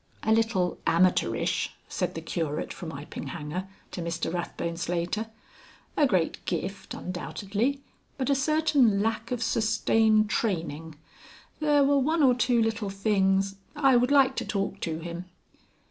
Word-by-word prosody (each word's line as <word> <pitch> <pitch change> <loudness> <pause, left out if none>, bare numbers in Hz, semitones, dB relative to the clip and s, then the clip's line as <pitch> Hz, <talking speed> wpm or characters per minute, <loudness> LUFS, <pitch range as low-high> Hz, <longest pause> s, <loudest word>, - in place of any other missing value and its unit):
"A 220 - +1
little 220 -6 +1
amateurish," 180 +2 +2
said - - -2
the - - -4
Curate 155 -3 -3
from 170 -3 -7
Iping 145 0 -7
Hanger 175 +3 -5 0.2
to 180 - -5
Mr 170 0 -3
Rathbone 170 -1 -3
Slater. 175 +5 -2 0.7
"A 295 - +4
great 185 -8 0
gift, 195 +1 -4
undoubtedly, 205 +9 -3 0.3
but 265 - -1
a 280 - +4
certain 275 -7 +3
lack 225 +1 -1
of 245 -2 -2
sustained 220 -1 +3
training. 165 -7 -2 0.6
There 295 -2 +4
were 280 0 +4
one 310 +4 +2
or 255 -2 +6
two 245 -1 +2
little 220 -2 -1
things... 195 -1 +1 0.2
I 275 -3 +4
would 245 +1 +3
like 275 -2 +5
to - - 0
talk 195 -1 -2
to 160 -4 -3
him." 170 +1 -6
210 Hz, 145 wpm, -27 LUFS, 175-250 Hz, 0.7 s, or